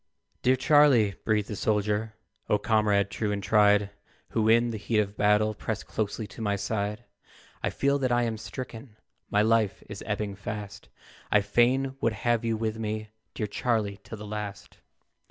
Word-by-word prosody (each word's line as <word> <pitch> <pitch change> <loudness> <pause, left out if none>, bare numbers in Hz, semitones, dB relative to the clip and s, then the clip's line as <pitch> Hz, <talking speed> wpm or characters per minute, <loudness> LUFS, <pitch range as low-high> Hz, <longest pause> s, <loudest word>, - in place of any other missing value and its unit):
"DEAR 130 +1 +4
Charlie," 135 -6 +5
breathed 105 -2 +1
a - - -2
soldier, 105 +1 0 0.3
"O 105 - +4
comrade 105 -2 +2
true 105 -2 -2
and 100 -1 -3
tried, 105 -1 +4 0.4
Who 110 -1 +1
in 115 +1 +4
the 110 - -5
heat 110 +2 -1
of 105 -1 0
battle 105 +1 +3
Pressed 110 +1 -4
closely 110 +1 -3
to 105 - -10
my 100 -2 0
side; 105 +2 -2 0.6
I - - 0
feel 140 +1 +1
that 130 -2 0
I 120 0 +3
am 115 -2 -2
stricken, 115 -1 -8 0.3
My 105 +1 +3
life 110 -2 +2
is - - -8
ebbing 105 -2 -2
fast; 105 0 -7 0.4
I 105 - +5
fain 130 +6 +2
would 115 - +2
have 120 +2 0
you 115 -1 0
with 110 0 -2
me, 110 0 -3 0.3
Dear 105 - -1
Charlie, 105 -1 -1
till 105 +2 -8
the 105 - -8
last. 105 -1 -6
110 Hz, 170 wpm, -27 LUFS, 105-115 Hz, 0.6 s, Charlie